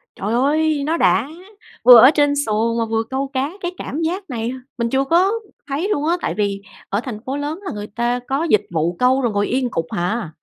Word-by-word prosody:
Trời 210 Hz, +4 st, -3 dB
ơi, 295 Hz, +3 st, +1 dB
nó 325 Hz, +3 st, 0 dB
đã! 255 Hz, -5 st, +3 dB, 0.6 s
Vừa 245 Hz, -2 st, +10 dB
ở 260 Hz, -, +8 dB
trên 290 Hz, -2 st, +2 dB
xuồng 225 Hz, +2 st, 0 dB
mà 230 Hz, -, 0 dB
vừa 225 Hz, 0 st, -1 dB
câu 270 Hz, +1 st, -2 dB
cá 265 Hz, +2 st, 0 dB
cái 350 Hz, 0 st, -2 dB
cảm 310 Hz, +4 st, -5 dB
giác 365 Hz, +4 st, -3 dB
này 235 Hz, -1 st, -3 dB, 0.3 s
mình 235 Hz, -1 st, -1 dB
chưa 270 Hz, +2 st, +1 dB
có 355 Hz, +7 st, +3 dB, 0.4 s
thấy 300 Hz, +9 st, -2 dB
luôn 295 Hz, -5 st, 0 dB
á, 345 Hz, +2 st, +2 dB
tại -, -, -2 dB
vì 200 Hz, -1 st, -1 dB, 0.3 s
ở 200 Hz, -, 0 dB
thành 235 Hz, -5 st, -6 dB
phố 270 Hz, +2 st, -3 dB
lớn 295 Hz, +5 st, -4 dB
là 385 Hz, -, -4 dB
người 210 Hz, 0 st, -6 dB
ta 240 Hz, +3 st, -1 dB
có 275 Hz, +4 st, 0 dB
dịch 210 Hz, -1 st, +3 dB
vụ 165 Hz, +1 st, -1 dB
câu 260 Hz, +2 st, +3 dB
rồi 235 Hz, -3 st, 0 dB
ngồi 205 Hz, 0 st, 0 dB
yên 255 Hz, -1 st, 0 dB
cục 165 Hz, -, -2 dB
hà. 180 Hz, +2 st, -2 dB
255 Hz, 230 wpm, -20 LUFS, 225-295 Hz, 0.6 s, Vừa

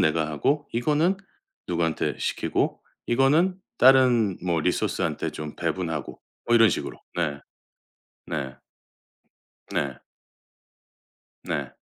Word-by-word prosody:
내가 80 Hz, 0 st, +2 dB
하고 140 Hz, -, 0 dB
이거는 150 Hz, +10 st, +2 dB, 0.5 s
누구한테 85 Hz, -2 st, 0 dB
시키고 -, -, -1 dB, 0.3 s
이거는 150 Hz, +9 st, +3 dB, 0.2 s
다른 125 Hz, -6 st, +5 dB
뭐 85 Hz, -2 st, +1 dB
리소스한테 -, -, -1 dB
좀 75 Hz, -1 st, -7 dB
배분하고 80 Hz, -3 st, -3 dB, 0.3 s
뭐 120 Hz, -, +3 dB
이런 115 Hz, -2 st, +7 dB
식으로 -, -, -3 dB, 0.2 s
네. 70 Hz, -1 st, -1 dB, 0.9 s
네. 65 Hz, 0 st, -4 dB, 1.2 s
네. 65 Hz, -3 st, -2 dB, 1.5 s
네. -, -, -3 dB
95 Hz, 200 characters per minute, -25 LUFS, -, 1.5 s, 이런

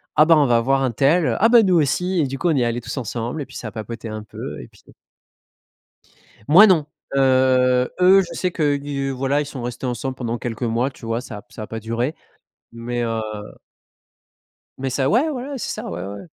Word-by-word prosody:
«Ah, 155 Hz, -, +6 dB
bah 165 Hz, 0 st, +6 dB
on 150 Hz, -, +4 dB
va 120 Hz, -1 st, +3 dB
voir 135 Hz, +3 st, +1 dB
untel», 140 Hz, +7 st, +2 dB
«Ah 225 Hz, -, +6 dB
bah, 235 Hz, -1 st, +7 dB
nous 190 Hz, -3 st, +2 dB
aussi» 175 Hz, +4 st, +1 dB
et 145 Hz, -, +1 dB
du 135 Hz, +1 st, -5 dB
coup, 175 Hz, -, 0 dB
on 160 Hz, -, +2 dB
y 135 Hz, -, +2 dB
est -, -, +2 dB
allés 120 Hz, +1 st, -2 dB
tous 120 Hz, -, -7 dB
ensemble, 120 Hz, +3 st, -4 dB
et -, -, -4 dB
puis -, -, -15 dB
ça 110 Hz, -, -6 dB
a -, -, -15 dB
papoté 115 Hz, +2 st, -7 dB
un 110 Hz, 0 st, -5 dB
peu, 105 Hz, -, -8 dB
et -, -, -11 dB
puis -, -, -23 dB, 1.7 s
Moi 180 Hz, +8 st, +9 dB
non, 165 Hz, -6 st, +3 dB, 0.3 s
heu, 130 Hz, -1 st, +3 dB
eux, 185 Hz, +2 st, +7 dB
je 180 Hz, -, -8 dB
sais 180 Hz, -1 st, -2 dB
qu'ils 145 Hz, -3 st, -1 dB
voilà 135 Hz, +2 st, 0 dB
ils 150 Hz, -, -3 dB
sont 140 Hz, -3 st, -7 dB
restés 120 Hz, +2 st, -5 dB
ensemble 125 Hz, +2 st, -3 dB
pendant 120 Hz, -2 st, -4 dB
quelques 120 Hz, 0 st, -5 dB
mois, 120 Hz, +3 st, 0 dB
tu 125 Hz, -, -15 dB
vois? 115 Hz, +1 st, -2 dB
Ça 120 Hz, -4 st, -8 dB
a -, -, -12 dB
p -, -, -44 dB
ça -, -, -8 dB
a -, -, -6 dB
pas 110 Hz, +1 st, -6 dB
duré, 115 Hz, +6 st, -2 dB, 0.6 s
mais, 120 Hz, +1 st, -4 dB
heu 115 Hz, -, -1 dB, 1.7 s
Mais 135 Hz, 0 st, -3 dB
ça, 135 Hz, +1 st, 0 dB
ouais, 255 Hz, +9 st, +3 dB
voilà, 275 Hz, 0 st, -5 dB
c'est 250 Hz, -, -4 dB
ça, -, -, -5 dB
ouais, 90 Hz, +2 st, -5 dB
ouais. 100 Hz, +1 st, -7 dB
130 Hz, 225 wpm, -21 LUFS, 120-150 Hz, 1.7 s, Moi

